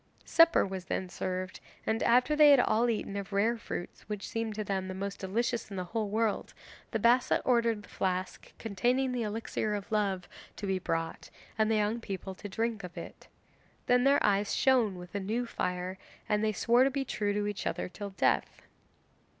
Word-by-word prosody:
Supper 330 0 +5
was 190 -2 -5
then 185 -1 -3
served, 185 0 -4 0.3
and 220 +1 0
after 250 +5 +4
they 300 -1 +8
had 280 -2 +8
all 240 0 +3
eaten 210 -3 -2
of 200 0 -5
rare 210 +4 +2
fruits 225 -6 -6
which 210 -1 -4
seemed 225 -2 -3
to 215 - -2
them 190 -2 -2
the 185 - -5
most 200 +1 -4
delicious 230 +5 -1
in 200 - -7
the 185 - -2
whole 210 +3 -2
world, 220 0 -1 0.3
the 225 - -1
Bassa 240 +3 +4
ordered 235 -4 +2
the - - -14
flask 185 0 -3
containing 245 +5 0
the 250 -1 -2
elixir 215 -1 -2
of 205 +1 -6
love 195 -4 0 0.3
to 205 - -6
be 190 -1 0
brought 165 -2 -3 0.3
and 220 -1 +2
the 220 - +3
young 215 +2 +1
people 190 -2 -5
to 205 +2 -9
drink 225 +1 -2
of 180 -1 -9
it. - - -9 0.6
Then 245 0 +4
their 275 +1 +4
eyes 200 0 +2
shone 240 -8 +3
with 180 0 -10
a 200 - -1
new 220 +5 -1
fire, 180 -3 -3 0.3
and 210 -1 +1
they 215 - +2
swore 235 +5 +4
to 270 - +4
be 270 0 -2
true 205 -4 -1
to 205 0 -1
each 205 -1 -3
other - - -2
till 200 +2 -7
death. 190 - 0
210 Hz, 200 wpm, -30 LUFS, 190-235 Hz, 0.6 s, they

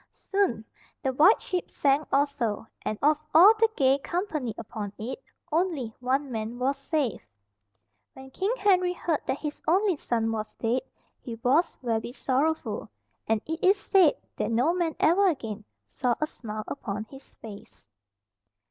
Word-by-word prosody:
Soon 390 - +1 0.4
the 265 - 0
White 320 - +6
Ship 365 -2 -3
sank 280 +2 +1
also, 275 -7 0 0.2
and 215 - -3
of 300 +1 +4 0.2
all 375 +7 +9
the 450 0 +5
gay 270 0 +4
company 310 - -2
upon 215 -2 -6
it 250 - -6 0.3
only 310 -9 0
one 265 +2 -1
man 225 +1 -4
was 260 +3 0
saved. 275 -3 -2 0.9
When 265 0 -12
King 390 - -1
Henry 365 -4 +3
heard 335 -3 -1
that - - 0
his 300 -1 -6
only 380 +3 +3
son 230 -5 -1
was 215 -1 -4
dead, 240 +3 0 0.4
he 235 -3 -6
was 290 +7 +2
very 230 0 -2
sorrowful, 280 +5 -1 0.4
and 220 -1 +1
it 320 +1 -5
is 390 +2 +5
said 380 -5 +4 0.2
that - - -1
no 245 +9 +2
man 345 -3 -1
ever 385 +5 +4
again 220 - -3 0.2
saw 245 -2 0
a 305 - +1
smile 215 -7 -7
upon 210 -6 -4
his 270 +5 -15
face. 205 - -12
275 Hz, 155 wpm, -27 LUFS, 230-335 Hz, 0.9 s, all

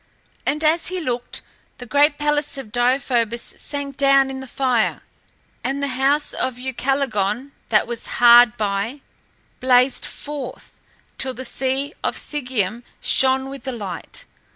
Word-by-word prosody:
And 300 +2 0
as 320 +2 +3
he 370 +1 -1
looked, 245 -6 -4 0.3
the 245 - -9
great 290 +4 +3
palace 295 -1 0
of 265 -6 -8
Deïphobus 240 -1 0
sank 280 -2 -3
down 275 -1 +4
in 265 - -6
the 265 - -8
fire 250 -3 0 0.6
and 270 - -1
the 280 - 0
house 275 +3 +2
of 260 -2 -2
Ucalegon 260 -2 -1 0.2
that 215 - +3
was 235 -1 -1
hard 240 0 +7
by, 210 +6 -2 0.6
blazed 255 0 +3
forth, 285 -4 -8 0.4
till 260 -1 -2
the 260 - -6
sea 270 +4 -2
by - - +1
Sigeüm 245 -7 -3 0.2
shone 265 0 +3
with 275 -2 -8
the 265 - -3
light. 200 -8 -7
260 Hz, 140 wpm, -21 LUFS, 240-280 Hz, 0.6 s, hard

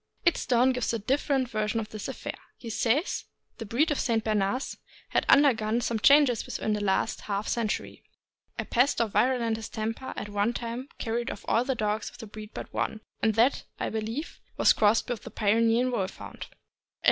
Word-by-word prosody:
"Idstone" 260 -6 +3
gives 250 -2 -1
a - - +1
different 265 +3 0
version 215 0 -1
of 215 -1 -5
this 215 -2 -6
affair. - - -5 0.2
He 230 - -7
says: 250 - 0 0.3
The 225 - -6
breed 285 +10 +2
of 295 - 0
St. 225 -3 +1
Bernards 215 +4 0 0.3
has - - +2
undergone 235 -6 +5
some 230 -2 -1
changes 275 -2 +5
within 215 - -1
the 210 0 -1
last 195 +3 0
half 200 0 -3
century. 225 -3 -2 0.6
A - - -2
pest 250 +2 +2
or 230 - +3
virulent 235 0 +1
distemper 225 +3 -4
at - - -4
one 205 +3 0
time 240 +3 -5
carried 235 +1 -2
off - - -7
all 230 - +3
the 265 0 -1
dogs 210 -1 -1
of - - -16
this 225 - -9
breed 215 -1 -8
but - - -8
one, 220 - -2 0.2
and 220 -2 +2
that, 235 +5 +3
I - - -1
believe, 225 +8 -4 0.2
was - - +6
crossed 215 +1 +3
with 245 -4 -3
the - - -9
Pyrenean 230 +3 +2
Wolf 190 -6 -2
hound. - - -8
230 Hz, 185 wpm, -28 LUFS, 215-250 Hz, 0.6 s, was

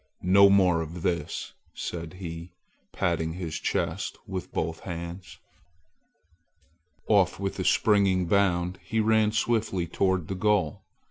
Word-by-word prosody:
"No 100 +2 +6
more 90 -4 +4
of 80 +1 -7
this!" 85 -1 -2 0.2
said 85 -1 -5
he, 85 -1 -8 0.4
patting 80 -2 -1
his 85 -3 -5
chest - - -2
with 95 -1 -6
both 80 0 -2
hands. 85 +1 -7 1.7
Off 100 -4 +3
with 100 0 -3
a - - 0
springing 95 -3 +3
bound, 90 -1 +1
he 110 - -2
ran 110 -1 +3
swiftly 105 -5 0
toward 95 0 0
the - - -3
goal. 95 -5 +1
90 Hz, 125 wpm, -27 LUFS, 85-100 Hz, 1.7 s, No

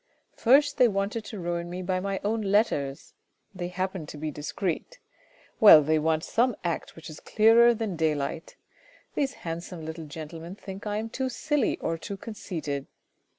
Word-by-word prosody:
First 285 +5 +4
they 250 - +6
wanted 205 +2 -1
to 215 - -7
ruin 170 0 -3
me 180 +1 -5
by 185 0 0
my 195 0 -2
own 220 +2 0
letters; 195 -10 0 0.4
they 180 -2 -4
happen 185 -2 -3
to 150 - -8
be 155 +1 -3
discreet; 175 - -4 0.6
well, 165 -8 +10
they 155 +2 +2
want 160 +1 +1
some 245 0 +1
act 170 -2 -3
which 165 - -11
is 155 0 -9
clearer 230 +2 +5
than 215 -6 -3
daylight. 155 0 -1 0.6
These 275 -2 0
handsome 165 0 -5
little 160 0 -6
gentlemen 165 +4 -8
think 195 0 -8
I 210 0 -1
am 220 +1 -3
too 260 +2 -2
silly 295 +3 0
or 165 0 -3
too 200 - -6
conceited. 160 - -5
185 Hz, 165 wpm, -27 LUFS, 160-215 Hz, 0.6 s, well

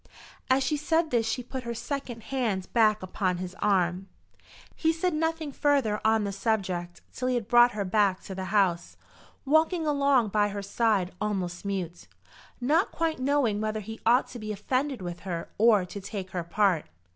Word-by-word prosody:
As 260 +1 +4
she 295 +4 0
said 320 +2 +1
this 230 -2 +1
she 245 +2 -2
put 260 +2 -6
her 235 -1 -5
second 245 -3 -5
hand 225 -9 -2
back 215 -3 +3
upon 185 -1 -1
his 180 0 -5
arm. 185 -1 +1 0.7
He 320 - +2
said 330 +2 -1
nothing 320 -1 -1
further 270 -7 +1
on 220 0 +3
the 200 - -2
subject 190 -4 -2
till 255 - -3
he 255 - +1
had 235 -4 -2
brought 240 +1 +6
her 205 -1 -2
back 195 -1 +2
to 195 - -7
the 190 0 -5
house, 190 -3 +1 0.5
walking 315 +4 +2
along 280 -6 +3
by 205 0 +2
her 200 0 -5
side 200 -3 +1
almost 190 -4 -2
mute, 180 -4 -4 0.5
not 300 +9 +2
quite 325 -3 -1
knowing 260 -6 +1
whether 215 0 -1
he 220 +2 -8
ought 240 +3 +4
to 245 - -8
be 215 -1 -5
offended 255 +3 -2
with 175 -1 -5
her 170 -3 -5
or 215 -4 +5
to 200 +3 -8
take 195 -1 -6
her 175 -2 -3
part. 180 -1 +1
215 Hz, 180 wpm, -27 LUFS, 190-260 Hz, 0.7 s, brought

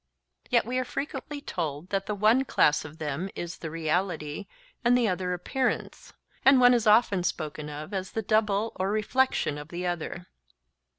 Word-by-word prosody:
Yet 235 -1 +3
we 250 +2 -1
are - - 0
frequently 285 +2 -5
told 160 - -4
that 195 -1 -1
the 210 - -1
one 220 +6 +4
class 150 - +3
of 155 +1 -10
them 155 +4 -3
is 175 0 -6
the 160 - -5
reality 165 +1 -2 0.4
and 245 +1 +5
the 240 -2 +2
other 185 -1 -1
appearance; 250 +9 -2 0.3
and 270 -1 +7
one 245 0 +7
is 235 -2 +2
often 210 -3 +5
spoken 155 -3 -3
of 150 +6 -7
as 190 -1 -4
the 220 - -2
double 215 0 +1
or 190 +1 0
reflection 215 - +1
of 150 - -9
the 175 +2 -5
other. 175 0 -3
195 Hz, 175 wpm, -27 LUFS, 165-230 Hz, 0.4 s, and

